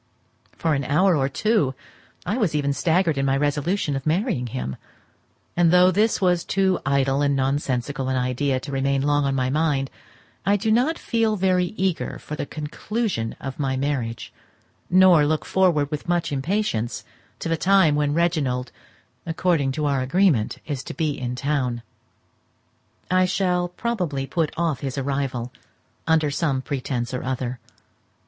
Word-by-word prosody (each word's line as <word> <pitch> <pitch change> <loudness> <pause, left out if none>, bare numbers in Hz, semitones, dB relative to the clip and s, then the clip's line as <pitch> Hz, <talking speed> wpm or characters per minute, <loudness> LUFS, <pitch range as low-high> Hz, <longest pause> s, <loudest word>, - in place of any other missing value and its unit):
For 160 -2 0
an 140 -1 0
hour 170 +7 +3
or 135 -2 +1
two 160 - +1 0.5
I 205 - -1
was 185 -9 +1
even 140 -1 +1
staggered 165 -1 +1
in 135 - +1
my 135 0 +2
resolution 145 +3 0
of 135 - -3
marrying 165 - 0
him, 65 - -4 0.8
and 175 -1 +4
though 180 +2 +6
this 215 +4 +2
was 180 -3 +2
too 190 -1 +1
idle 135 0 +2
and 140 -1 +2
nonsensical 135 0 -1
an 130 - 0
idea 130 +1 0
to 140 - -7
remain 135 0 0
long 145 0 +2
on 135 0 0
my 130 -1 0
mind, 145 -3 0 0.5
I 200 +3 +3
do 220 +2 0
not 260 +9 +2
feel 225 -2 0
very 185 -2 +2
eager 185 -3 -1
for 150 - -7
the 145 - -4
conclusion 155 - -3
of 135 +1 -6
my 135 -2 0
marriage, 130 -5 -3 0.6
nor 180 -3 +6
look 155 +1 0
forward 165 -6 +2
with 150 +3 -5
much 175 -2 0
impatience 140 - -1 0.3
to - - -5
the 165 - +1
time 185 -2 +4
when 145 0 +1
Reginald, 145 -8 0 0.6
according 165 -4 +1
to 150 +2 -2
our 140 -2 +1
agreement, 135 - +2
is 140 -4 -4
to - - -7
be 160 -3 0
in 125 -3 -4
town. 125 -3 -1 1.3
I 185 0 +4
shall 180 -1 +1
probably 180 -9 -2
put 160 +1 -1
off 165 -5 0
his 135 -1 -4
arrival 135 -3 -2 0.6
under 155 -2 +3
some 140 -3 0
pretence 130 -3 -3
or 125 - -2
other. 130 -1 -3
145 Hz, 160 wpm, -23 LUFS, 135-180 Hz, 1.3 s, though